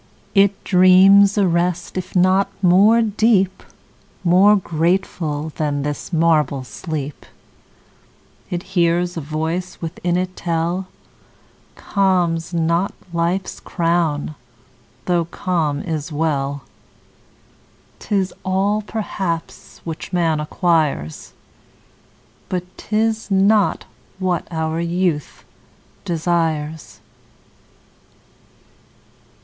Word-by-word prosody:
It 200 -1 +3
dreams 195 +2 +6
a 200 -2 +3
rest, 175 0 -1
if 185 0 -5
not 185 +2 +3
more 205 +6 +5
deep, 210 -3 +2 0.6
More 190 +4 +5
grateful 165 -3 -1
than 145 -2 -1
this 145 +4 -4
marble 155 -5 +2
sleep; 150 +1 -6 1.3
It 175 0 -3
hears 175 0 +1
a 165 - -3
voice 160 +5 -3
within 175 +1 -2
it 185 0 -3
tell: 170 +2 -2 0.9
Calm's 180 -4 0
not 170 +2 0 0.2
life's 170 +3 -1
crown, 165 -4 -1 0.7
though 175 -2 +1
calm 165 -4 -2
is 160 -2 -4
well. 145 -3 -1 1.4
'Tis 195 -2 -1
all 195 +3 +1
perhaps 195 -6 -5
which 165 -1 -6
man 165 -4 +1
acquires, 150 - -1 1.2
But 180 -2 -2
'tis 220 0 -1
not 200 +1 +3 0.3
what 185 -3 -1
our 160 -1 -2
youth 170 -3 -1 0.6
desires. 160 -2 -2
175 Hz, 85 wpm, -20 LUFS, 160-190 Hz, 1.4 s, dreams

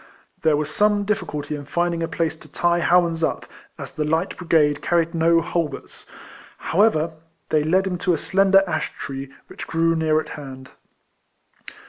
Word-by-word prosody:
There 155 -2 +3
was 150 0 -3
some 205 -1 +2
difficulty 150 -8 -3
in 145 -1 -8
lindnig 170 -1 +1
a 165 - -1
place 165 -1 -2
to - - -16
tie 175 0 +1
Howans 170 -1 +2
up, 160 - -1 0.3
as - - -8
the 155 - -2
light 160 +5 -1
brigade 155 -4 +2
carried 170 -1 +1
no 165 0 +3
halberts. 165 -4 -4 0.5
However, 170 -4 +2 0.4
they 155 -1 +2
led 185 +5 +2
him 180 -2 -3
to 180 -2 +1
a - - -3
slender 195 +3 +3
ash 155 -4 -2
tree 135 0 -6
which - - -9
grew 165 0 +1
near 155 -1 +2
at - - -6
hand. 130 -3 -9
165 Hz, 165 wpm, -22 LUFS, 155-175 Hz, 0.5 s, There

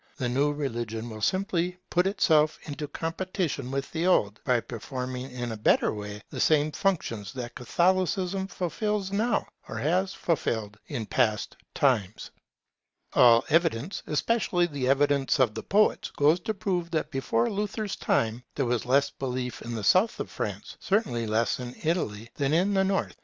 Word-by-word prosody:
The 125 - -1
new 140 +4 +2
religion 120 -5 -4
will 110 -1 -8
simply 180 - 0
put 180 +1 +3
itself 155 -6 +3
into 150 0 -5
competition 165 -3 -3
with 135 +1 -3
the 170 +2 0
old 105 - +2
by 125 -3 +3
performing 125 +2 -5
in 125 -2 -4
a 110 - -5
better 105 - +3
way 105 -1 -7
the - - -5
same 155 -1 +3
functions 130 - -1
that 120 -2 -6
Catholicism 185 +6 +1
fulfils 195 +2 -2
now, 220 +4 +1 0.2
or - - -5
has 185 +6 +1
fulfilled 110 -10 -1
in 125 -7 -4
past 110 -3 0 0.2
times. 110 -8 +1 0.8
All 115 -1 +6
evidence, 165 - +1
especially 180 +2 +1
the 145 -6 -3
evidence 140 0 +3
of 125 -5 +3
the - - -5
poets, 210 +2 +2
goes 150 +4 +4
to 220 +5 -2
prove 185 -4 -1
that 160 -2 -2
before 120 -3 0
Luther's 205 0 -2
time, 115 +2 0
there 140 - 0
was 120 0 -1
less 135 +2 +3
belief 125 -2 -4
in 120 0 -5
the 110 - -4
South 190 - +3
of - - -5
Europe, - - -2 0.2
certainly 155 - 0
less 110 +3 +1
in 125 0 -6
Italy, 120 - -1
than 140 +1 +1
in 190 +4 +2
the 190 -1 +3
North. 195 0 -1
145 Hz, 165 wpm, -27 LUFS, 120-180 Hz, 0.8 s, All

